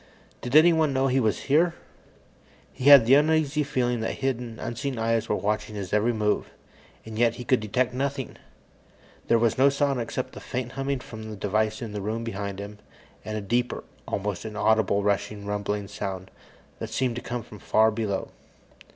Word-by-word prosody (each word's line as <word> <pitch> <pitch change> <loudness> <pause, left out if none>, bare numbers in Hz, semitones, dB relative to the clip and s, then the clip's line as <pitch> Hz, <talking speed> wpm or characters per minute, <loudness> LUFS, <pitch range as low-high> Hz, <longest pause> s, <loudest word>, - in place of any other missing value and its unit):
Did 125 +3 -3
anyone 160 -2 +6
know 135 0 +2
he 135 0 +2
was 110 -7 +1
here? 160 +5 +2 1.0
He 130 - -6
had 140 -4 +9
the 125 - +5
uneasy 150 0 +3
feeling 125 -4 0
that 110 - -2
hidden, 125 -4 -3
unseen 130 +2 -4
eyes 115 0 0
were - - +2
watching 105 +1 -2
his 100 -2 -5
every 105 +3 +3
move, 105 -2 0 0.6
and 110 0 -6
yet 120 -1 +3
he 125 - -7
could 130 -3 +3
detect 125 +4 0
nothing. 135 +1 -3 0.9
There 115 - +4
was 115 +1 +1
no 135 +1 +6
sound 140 -2 0
except 120 +2 -4
the - - -8
faint 125 -1 -4
humming 135 -1 -2
from 110 -2 -9
the 110 - -6
device 110 +3 -1
in 115 - -5
the 105 - -4
room 110 +3 -3
behind 100 -3 -4
him, 100 +1 -8 0.4
and 110 0 -4
a - - -3
deeper, 120 +5 -1 0.2
almost 100 -2 -3
inaudible, 110 -1 +1
rushing, 100 0 -1
rumbling 105 0 -2
sound 95 -2 -5 0.5
that - - -5
seemed 125 -3 -1
to - - -4
come 120 -1 -4
from 105 -2 -12
far 110 0 +3
below. 105 -3 -2
115 Hz, 180 wpm, -26 LUFS, 105-130 Hz, 1.0 s, had